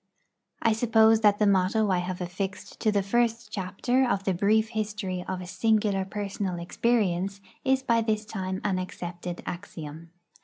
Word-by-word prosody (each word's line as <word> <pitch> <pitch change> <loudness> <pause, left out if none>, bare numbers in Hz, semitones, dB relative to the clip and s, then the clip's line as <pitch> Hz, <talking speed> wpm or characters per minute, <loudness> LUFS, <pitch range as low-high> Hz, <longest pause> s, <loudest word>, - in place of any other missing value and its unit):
I 225 - +4
suppose 225 -1 +5
that 205 -1 +5
the 210 - +3
motto 200 +2 +3
I 180 - +2
have 180 +1 -4
affixed 190 +2 -5
to 215 - +2
the 200 -1 +1
first 235 +3 0
chapter 210 +7 0
of 195 -4 0
the 195 - +1
brief 215 +4 +2
history 205 -5 -3
of 185 -1 -3
a - - -6
singular 205 0 +1
personal 195 -2 -3
experience 195 0 0 0.2
is 265 0 +2
by 230 -2 +3
this 215 -1 -1
time 190 -3 -4
an 190 -3 0
accepted 175 -1 -6
axiom. 165 -3 -7
200 Hz, 160 wpm, -27 LUFS, 185-220 Hz, 0.2 s, suppose